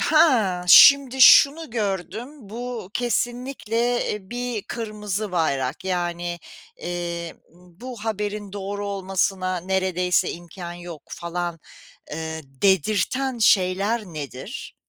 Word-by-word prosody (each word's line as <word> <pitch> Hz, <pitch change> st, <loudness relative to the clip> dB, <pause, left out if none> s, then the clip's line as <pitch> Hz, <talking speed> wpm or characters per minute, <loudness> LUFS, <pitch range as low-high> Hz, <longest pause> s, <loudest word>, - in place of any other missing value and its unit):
"Ha, 255 Hz, -, +3 dB
şimdi 270 Hz, +4 st, +8 dB
şunu 285 Hz, +4 st, +7 dB
gördüm. 205 Hz, 0 st, -3 dB, 0.2 s
Bu 235 Hz, -3 st, -6 dB
kesinlikle, 245 Hz, -1 st, -2 dB, 0.4 s
eee, 200 Hz, -1 st, -8 dB
bir 245 Hz, -3 st, -3 dB
kırmızı 210 Hz, -3 st, -5 dB
bayrak. 140 Hz, -4 st, -1 dB
Yani, 175 Hz, -1 st, -2 dB, 0.4 s
eee, 170 Hz, -1 st, -5 dB, 0.2 s
bu 205 Hz, +7 st, -11 dB
haberin 210 Hz, -2 st, -3 dB
doğru 200 Hz, 0 st, -5 dB
olmasına 190 Hz, -1 st, -1 dB
neredeyse 185 Hz, -1 st, 0 dB
imkân 175 Hz, +1 st, -9 dB
yok." 175 Hz, -4 st, -9 dB
falan, 170 Hz, 0 st, -4 dB, 0.5 s
eee, 160 Hz, +1 st, -5 dB
dedirten 200 Hz, -, 0 dB
şeyler 200 Hz, +2 st, +2 dB
nedir? 155 Hz, -, -8 dB
195 Hz, 95 wpm, -23 LUFS, 175-230 Hz, 0.5 s, şimdi